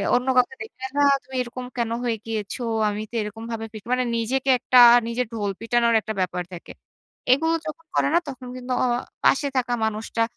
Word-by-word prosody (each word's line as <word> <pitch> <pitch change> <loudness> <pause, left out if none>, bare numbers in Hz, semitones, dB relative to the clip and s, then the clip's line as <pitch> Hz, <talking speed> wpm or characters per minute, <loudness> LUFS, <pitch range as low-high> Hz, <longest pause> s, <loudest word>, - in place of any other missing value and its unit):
অন্য 250 +1 0
কাউকে 250 - +3
দেখলে 435 - -14
না - - +4 0.2
তুমি 265 - -11
এরকম 250 +1 -7
কেন 235 -1 -1
হয়ে 235 -2 0
গিয়েছো? 220 +2 -4 0.3
আমি 210 +1 -3
তো - - -8
এরকম 215 +2 -6
ভাবে 225 -1 -4
ফিট 215 -2 -9
মানে 255 0 +2
নিজেকে 260 +4 -1
একটা 255 0 +4 0.3
নিজে 235 +2 -1
ঢোল 205 -3 -2
পিটানোর 235 0 +2
একটা 220 +1 -4
ব্যাপার 180 -1 -2
থাকে। 175 - -9 0.6
এগুলো 325 +5 +1
যখন 310 +2 -7
করে - - +3
না - - +6
তখন 260 -2 -8
কিন্তু 255 0 -4
অ - - +3 0.4
পাশে 285 +1 +4
থাকা 245 -1 0
মানুষটা 220 +1 -1
240 Hz, 190 wpm, -23 LUFS, 225-255 Hz, 0.6 s, না